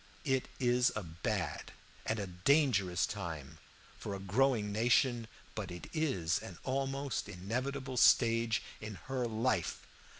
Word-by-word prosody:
It 130 -2 +1
is 125 -1 +3
a 105 - -2
bad 85 0 -3 0.3
and 110 - +1
a 100 - -2
dangerous 100 - +2
time 75 -3 -6 0.4
for 100 - -4
a - - -6
growing 105 +2 +2
nation, 120 +2 +3 0.3
but 105 -4 -4
it 90 0 -8
is 115 - +1
an 90 - -9
almost 135 -3 -2
inevitable 130 +8 -3
stage 115 -2 +5 0.2
in 110 -1 -6
her 130 -2 -1
life. 110 -4 0
115 Hz, 130 wpm, -34 LUFS, 95-130 Hz, 0.4 s, stage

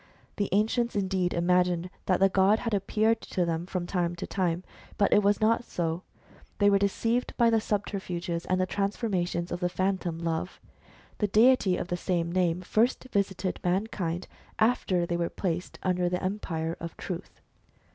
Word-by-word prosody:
The 205 - 0
ancients 220 +4 +1
indeed 190 -2 0
imagined 180 0 +1 0.2
that 185 - +3
the 195 - +6
god 195 +2 +4
had 230 -1 -3
appeared 215 +3 +1
to 180 - -1
them 165 +1 -2
from 180 -2 -3
time 175 -1 -1
to 170 - -5
time; 180 -2 -1 0.3
but 200 - +3
it 210 - +6
was 205 0 +3
not 230 +2 +3
so. 170 -5 -2 0.6
They 205 0 +4
were 200 - +4
deceived 225 +5 0
by 235 -2 +4
the 225 -1 +3
subterfuges 180 -5 -3
and 185 0 +1
transformations 190 -4 -1
of 175 - -2
the 180 -1 0
Phantom 185 -2 -1
Love. 165 +1 -3 0.6
The 210 - +2
deity 215 -2 +4
of - - -4
the 175 - -1
same 170 -1 -1
name 180 -1 +1
first 225 +7 +1
visited 195 -2 -1
mankind 180 -2 -1 0.3
after 215 -6 +2
they 170 0 -1
were 170 0 -1
placed 180 -2 -3
under 180 -1 +1
the 180 +1 -2
empire 170 -4 -2
of 170 -1 -7
Truth. 180 0 -6
185 Hz, 165 wpm, -28 LUFS, 175-205 Hz, 0.6 s, the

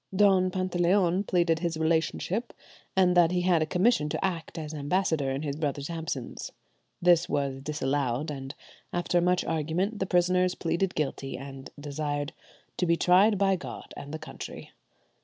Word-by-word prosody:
Don 190 -2 +5
Pantaleon 185 0 +2
pleaded 170 -3 +2
his 170 -2 -2
relationship, 165 +7 0 0.4
and 185 -1 +4
that 175 -2 +6
he 180 0 0
had 175 -2 +3
a 155 - +1
commission 180 -3 +2
to 195 - -1
act 170 -2 -4
as 155 -1 -5
ambassador 150 -1 0
in 135 +2 -2
his 140 -2 -2
brother's 145 0 -2
absence; 160 -6 -5 0.5
this 175 0 +5
was 140 -2 -1
disallowed, 140 -1 -1
and 135 -1 -6 0.4
after 175 0 +1
much 180 +1 +2
argument 165 +7 -1
the 190 - -1
prisoners 180 0 +2
pleaded 170 +3 -1
guilty, 135 -2 -2
and 135 0 -9
desired 145 +1 -3 0.4
"to 180 - +1
be 170 - +4
tried 195 +5 +5
by 195 0 +3
God 180 - -8
and 145 - -8
the 155 - -3
country." 155 - -9
165 Hz, 160 wpm, -28 LUFS, 145-180 Hz, 0.5 s, that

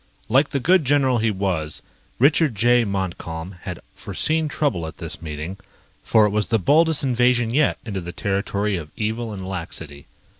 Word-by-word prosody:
Like 135 +5 +4
the 140 - -1
good 180 +5 +4
general 135 -3 +3
he 110 +1 +2
was, 95 -7 -2 0.3
Richard 145 0 +3
J. 120 +3 +4
Montcalm 90 -3 -4
had - - -6
foreseen 160 0 -1
trouble 140 - -1
at 80 - -9
this 80 -2 -7
meeting, 80 +4 -6 0.4
for 110 -2 +4
it 105 - +1
was 105 0 +1
the 115 - +2
boldest 155 - +3
invasion 125 -2 +2
yet 145 +4 +2
into 100 -4 -4
the 85 0 -6
territory 100 +1 -1
of 80 -3 -7
evil 110 +1 -2
and 95 -3 -6
laxity. 80 -6 -6
105 Hz, 165 wpm, -22 LUFS, 90-130 Hz, 0.4 s, Like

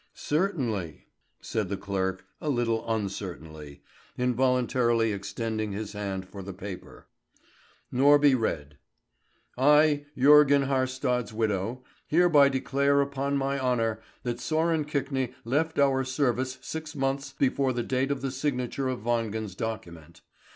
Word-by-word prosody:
"Certainly," 130 - -2 0.4
said 105 -5 -2
the 100 - -2
clerk, 95 -1 -2 0.2
a 155 - -2
little 115 -4 0
uncertainly, 85 -8 -5 0.3
involuntarily 125 -2 +2
extending 105 +1 -3
his 105 +1 -5
hand 95 -2 -4
for 100 +1 -9
the 95 0 -8
paper. 100 -1 -9 0.9
Norby 145 +2 +5
read: 75 - -3 0.8
"I, 150 +1 +4
Jörgen 140 +1 +6
Haarstad's 130 -3 -1
widow, 110 +2 -1 0.2
hereby 155 -4 +5
declare 140 +1 +1
upon 140 0 0
my 140 0 -1
honour 115 -4 0 0.2
that 120 -1 -2
Sören 160 +2 0
Kvikne 135 -3 -2
left 160 +6 0
our 135 -1 +3
service 130 -1 -1
six 160 0 -6
months 135 0 -1
before 135 0 +2
the 120 -1 -2
date 130 +3 0
of 140 -1 -2
the 135 -1 -2
signature 130 -1 -2
of 130 - -3
Wangen's 110 -3 -1
document. 85 -7 -6
125 Hz, 125 wpm, -27 LUFS, 110-140 Hz, 0.9 s, Jörgen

